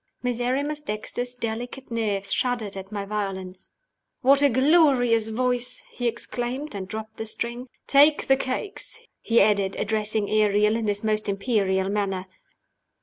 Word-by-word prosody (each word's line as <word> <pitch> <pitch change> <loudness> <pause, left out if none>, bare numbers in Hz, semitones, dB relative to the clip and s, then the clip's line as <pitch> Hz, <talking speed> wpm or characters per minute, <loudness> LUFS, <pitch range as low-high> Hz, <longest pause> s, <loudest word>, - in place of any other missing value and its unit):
Miserrimus 255 +5 -1
Dexter's 245 0 -4
delicate 245 +2 -5
nerves 205 -4 -1
shuddered 240 -6 -1
at 190 +1 -8
my 200 -1 -3
violence. 195 -3 -5 0.5
"What 275 +2 +5
a 285 - +6
glorious 260 -5 +4
voice!" 250 +1 0
he 245 - -2
exclaimed 245 +4 -4
and 190 -2 -5
dropped 220 +2 -7
the 220 - -5
string. 235 +3 -3 0.2
"Take 290 +2 +5
the 270 - +5
cakes," 270 +10 -3 0.2
he 230 0 +3
added, 200 -2 +2
addressing 215 0 -1
Ariel 210 0 +3
in 225 -1 -1
his 205 0 -1
most 215 -1 0
imperial 195 -2 +1
manner. 195 -2 -1
225 Hz, 140 wpm, -25 LUFS, 205-250 Hz, 0.5 s, a